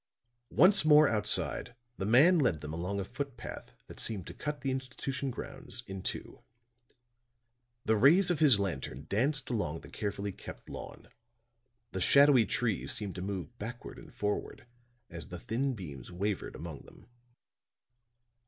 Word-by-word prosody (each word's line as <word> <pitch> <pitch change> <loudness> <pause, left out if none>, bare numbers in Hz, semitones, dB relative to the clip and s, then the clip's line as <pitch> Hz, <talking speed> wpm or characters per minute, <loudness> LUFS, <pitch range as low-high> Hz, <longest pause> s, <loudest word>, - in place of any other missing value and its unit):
Once 190 0 +5
more 155 -1 +7
outside, 105 +2 +2 0.2
the 95 - -1
man 155 +11 +6
led 100 - +1
them 75 +1 -6
along 90 +5 -3
a 95 - -3
foot 135 +3 -5
path - - -9
that - - -11
seemed 100 -5 -4
to - - -8
cut 150 -1 -5
the 135 - -1
institution 130 +1 -3
grounds 130 -1 -5
in 95 -1 -6
two. - - -5 1.4
The 110 - +3
rays 170 - +6
of 165 - 0
his 135 -9 +6
lantern 70 -7 -3
danced 135 +7 0
along 80 -9 -2
the - - -12
carefully 100 -1 -3
kept - - -11
lawn; - - -9 0.8
the 95 - -3
shadowy 140 -1 +6
trees 115 -6 -1
seemed 100 -3 -5
to 90 - -6
move 95 +3 -5
backward 120 +3 -7
and - - -13
forward, 105 +2 -3 0.4
as 85 -6 -9
the 90 - -7
thin 125 +9 -1
beams 75 - -8
wavered 100 +2 -3
among 80 -4 -7
them. - - -17
110 Hz, 155 wpm, -31 LUFS, 95-135 Hz, 1.4 s, more